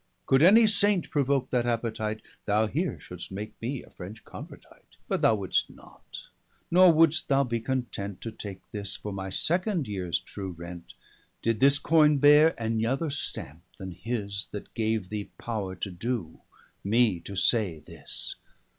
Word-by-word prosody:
Could 135 +1 +4
any 215 +7 +8
Saint 205 -3 +3
provoke 140 -2 +1
that 120 -1 +1
appetite, 110 -2 -2 0.2
Thou 105 +1 +2
here 160 +11 -2
should'st 90 -1 -9
make 105 +3 -6
me 125 +3 -3
a - - -18
French 100 +5 -10
convertite. - - -13
But - - -1
thou 110 - +5
would'st 100 -3 0
not; - - -13 0.5
nor 180 +1 +7
would'st 160 -1 +3
thou 140 0 +3
be 120 -3 -2
content, 115 -6 -3
To 115 - -5
take 100 -3 -8
this, 100 -2 -2
for 105 - -6
my 95 0 -5
second 175 - 0
yeares 95 -4 -2
true 95 -2 -7
Rent, 85 +1 -10 0.5
520 115 - +3
Did 110 - -9
this 140 +2 +6
Coine 150 -1 +4
beare 150 +3 +6
any 110 -1 -1
other 135 +6 0
stampe, 80 - -5 0.2
then 95 -1 -7
his, 100 +1 -4
That 105 - -8
gave 110 -4 -1
thee 105 -1 -5
power 105 -5 -4
to 95 +2 -5
doe, 95 -2 -4 0.4
me, 110 -2 +3
to 100 +4 -8
say 95 -5 +2
this. - - -4
115 Hz, 165 wpm, -27 LUFS, 100-140 Hz, 0.5 s, any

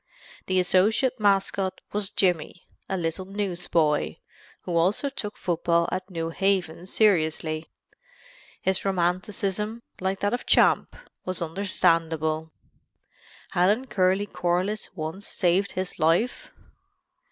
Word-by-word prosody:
The 185 0 +2
associate 210 +8 +2
mascot 195 -2 +1
was 205 -2 -1
Jimmy, 175 -2 0 0.2
a 190 - -1
little 170 +2 -2
newsboy, 175 - 0 0.5
who 175 - -4
also 190 +11 +2
took 210 -5 -6
football 170 -1 +1
at 185 +1 -3
New 165 -2 -3
Haven 180 -2 0
seriously. 160 -6 +1 1.0
His 190 0 +1
romanticism, 195 +4 -1 0.2
like 190 +1 -2
that 205 +2 +1
of 245 - -3
Champ, - - +4 0.3
was 185 -1 -2
understandable. 160 -3 0 1.0
Hadn't 210 +9 +2
Curly 190 +1 +2
Corliss 180 +3 -1
once 160 +5 -5
saved 185 +2 +1
his 185 -1 -4
life? 165 +10 +1
185 Hz, 105 wpm, -26 LUFS, 170-200 Hz, 1.0 s, Champ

